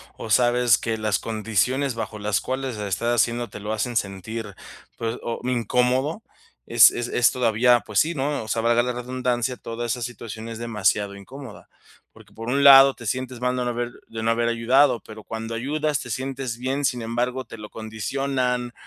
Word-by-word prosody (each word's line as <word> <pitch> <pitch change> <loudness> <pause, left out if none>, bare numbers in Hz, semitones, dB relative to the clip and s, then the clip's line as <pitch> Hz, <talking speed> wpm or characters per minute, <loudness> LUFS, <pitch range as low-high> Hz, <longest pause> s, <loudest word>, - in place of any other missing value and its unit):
o 110 - -8
sabes 120 +1 +4
que 115 -1 -2
las 110 -2 0
condiciones 115 +5 0
bajo 115 -1 -5
las 105 -2 0
cuales 130 -2 -3
la 105 -1 -4
estás 115 +5 0
haciendo 120 -1 -1
te 105 - -9
lo 105 +1 -3
hacen 115 +2 -1
sentir, 100 +1 -4 0.4
pues, 115 +1 -3
o 115 - -4
incómodo, 125 - 0 0.4
es 115 -1 +7
es 120 0 -4
es 125 - +4
todavía, 120 -1 +3
pues 105 -3 0
sí, 165 +2 +2
¿no? 145 0 -1
O - - -10
sea, 115 0 -1
valga 120 +1 +3
la 125 0 -2
redundancia, 125 0 -2
toda 115 +1 -5
esa 120 +1 -2
situación 115 -2 -6
es 115 -1 -7
demasiado 105 -3 0
incómoda, 130 +3 -11 0.5
porque - - -18
por 115 +1 -8
un 140 +3 +1
lado 135 -1 +9
te 120 - -12
sientes 130 +1 -3
mal 125 - +1
de 125 - 0
no - - 0
haber 120 0 -3 0.2
de 110 0 -6
no 115 - +2
haber 115 0 +1
ayudado, 125 +2 +3
pero 110 -1 -11
cuando 115 0 -5
ayudas 150 +4 -1
te 120 - -8
sientes 130 0 -4
bien, 135 +3 -1
sin 125 -2 0
embargo, 125 +3 -2
te 115 - -11
lo 105 -1 -9
condicionan, 125 +2 -2
120 Hz, 195 wpm, -24 LUFS, 110-130 Hz, 0.5 s, lado